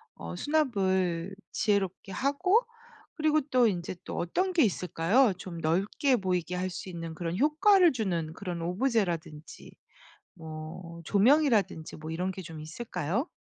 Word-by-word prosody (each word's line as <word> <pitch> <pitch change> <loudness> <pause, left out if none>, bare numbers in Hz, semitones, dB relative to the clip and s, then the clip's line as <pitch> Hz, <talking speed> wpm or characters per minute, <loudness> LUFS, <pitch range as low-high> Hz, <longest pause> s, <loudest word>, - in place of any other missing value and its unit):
어 85 +1 -7
수납을 190 - 0 0.2
지혜롭게 200 -3 0
하고 285 - +2 0.5
그리고 310 -1 +2
또 250 -2 +5
인제 180 -2 -2
또 - - -6
어떤 365 - 0
게 335 -4 +5
있을까요? 195 +3 +2
좀 175 -3 -8
넓게 195 - +1
보이게 180 -2 -1
할 185 +1 -1
수 185 +1 -7
있는 165 -2 -6
그런 170 +2 -3
효과를 335 - +5
주는 175 -10 -2
그런 175 -2 -5
오브제라든지 175 - -2 0.6
뭐 160 +2 -8
조명이라든지 220 - +3
뭐 155 +1 -7
이런 180 +3 -2
게 190 0 -7
좀 160 -2 -9
있을까요? 180 - -3
185 Hz, 290 characters per minute, -29 LUFS, 170-250 Hz, 0.6 s, 또